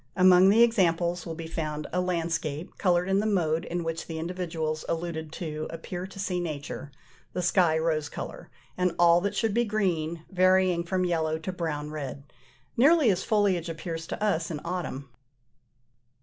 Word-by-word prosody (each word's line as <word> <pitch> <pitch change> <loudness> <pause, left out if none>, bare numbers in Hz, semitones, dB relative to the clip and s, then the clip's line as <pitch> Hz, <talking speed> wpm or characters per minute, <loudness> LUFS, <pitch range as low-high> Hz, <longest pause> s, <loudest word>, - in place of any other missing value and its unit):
Among 185 0 +7
the 225 +4 +6
examples 175 -6 +2
will 165 - -4
be 165 0 -6
found 155 -2 -4
a 180 - +2
landscape, 165 -3 -2
coloured 180 -1 +2
in 195 +1 +2
the 215 - 0
mode 165 -6 +1
in 175 0 -3
which 165 0 -4
the 165 - -5
individuals 160 -2 -3
alluded 160 -2 -3
to 155 -3 -4
appeared 175 +3 -6
to 195 - -11
see 185 -2 -1
nature: 150 -3 -5 0.4
the 180 - -2
sky 175 -3 +3
rose 160 -2 0
colour, - - -7 0.3
and 180 -1 0
all 170 0 +5
that 200 +2 -2
should 225 -3 +1
be 240 +2 +3
green 170 -7 -1
varying 185 -1 +3
from 185 +1 0
yellow 160 -2 0
to 160 +4 -4
brown 150 -4 -3
red, 140 -2 -6 0.5
nearly 285 -1 +5
as 185 -1 -1
foliage 195 -6 +1
appears 165 0 -5
to - - -4
us 175 -6 +1
in 155 -3 -4
autumn. 170 -6 -4
170 Hz, 170 wpm, -27 LUFS, 160-185 Hz, 0.5 s, Among